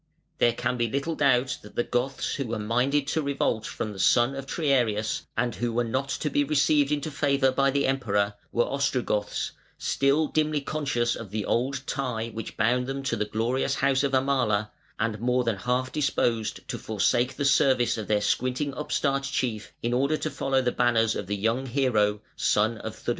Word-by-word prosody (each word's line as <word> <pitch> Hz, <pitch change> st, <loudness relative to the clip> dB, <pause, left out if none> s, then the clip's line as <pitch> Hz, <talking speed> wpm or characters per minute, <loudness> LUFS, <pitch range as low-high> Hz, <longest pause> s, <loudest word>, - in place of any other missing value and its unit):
There 120 Hz, -, +4 dB
can 125 Hz, +1 st, -2 dB
be 120 Hz, -1 st, 0 dB
little 140 Hz, +7 st, -1 dB
doubt 130 Hz, -4 st, +2 dB
that 105 Hz, -, -14 dB
the 120 Hz, -, +1 dB
Goths 125 Hz, +3 st, -1 dB
who 140 Hz, -3 st, -3 dB
were 115 Hz, -, -2 dB
minded 125 Hz, +7 st, +1 dB
to 160 Hz, -, 0 dB
revolt 135 Hz, -6 st, -1 dB
from 105 Hz, -, -4 dB
the 95 Hz, -, -10 dB
son 120 Hz, +7 st, +4 dB
of 135 Hz, 0 st, -6 dB
Triarius 120 Hz, -9 st, 0 dB
and 120 Hz, 0 st, +1 dB
who 120 Hz, +1 st, -2 dB
were 120 Hz, +1 st, +1 dB
not 130 Hz, +4 st, -2 dB
to 150 Hz, -, -2 dB
be 145 Hz, -, +2 dB
received 150 Hz, 0 st, +2 dB
into 150 Hz, +1 st, -1 dB
favour 140 Hz, -2 st, +2 dB
by 135 Hz, +1 st, +2 dB
the 140 Hz, +1 st, +1 dB
Emperor, 105 Hz, -6 st, +1 dB, 0.2 s
were 120 Hz, -, +2 dB
Ostrogoths, 125 Hz, -7 st, -1 dB, 0.3 s
still 140 Hz, +3 st, +2 dB
dimly 155 Hz, 0 st, 0 dB
conscious 135 Hz, -5 st, -1 dB
of 115 Hz, -, -8 dB
the 105 Hz, +1 st, -3 dB
old 130 Hz, +3 st, 0 dB
tie 125 Hz, -5 st, -2 dB
which 115 Hz, -1 st, -7 dB
bound 125 Hz, +3 st, +2 dB
them 135 Hz, 0 st, -4 dB
to 135 Hz, -, 0 dB
the 105 Hz, -, -1 dB
glorious 125 Hz, +6 st, 0 dB
house 135 Hz, -1 st, +2 dB
of 140 Hz, -1 st, 0 dB
Amala, 130 Hz, -6 st, +1 dB, 0.3 s
and 110 Hz, -1 st, -1 dB
more 125 Hz, +2 st, +1 dB
than 115 Hz, -4 st, -1 dB
half 125 Hz, +4 st, -1 dB
disposed 115 Hz, -6 st, -1 dB
to -, -, -4 dB
forsake 120 Hz, +4 st, +1 dB
the 140 Hz, -, -2 dB
service 135 Hz, -3 st, +3 dB
of 110 Hz, -3 st, -5 dB
their 105 Hz, -1 st, +2 dB
squinting 130 Hz, +6 st, 0 dB
upstart 140 Hz, -1 st, 0 dB
chief 125 Hz, -6 st, -2 dB
in 120 Hz, +1 st, 0 dB
order 140 Hz, +5 st, +2 dB
to 155 Hz, -, -3 dB
follow 135 Hz, -1 st, 0 dB
the 125 Hz, -, +1 dB
banners 115 Hz, -3 st, +2 dB
of 95 Hz, -, -4 dB
the 105 Hz, +1 st, -2 dB
young 115 Hz, +6 st, 0 dB
hero, 110 Hz, -6 st, +1 dB
son 110 Hz, +2 st, +1 dB
of -, -, -6 dB
Theudemir. -, -, -6 dB
125 Hz, 195 wpm, -26 LUFS, 115-140 Hz, 0.3 s, There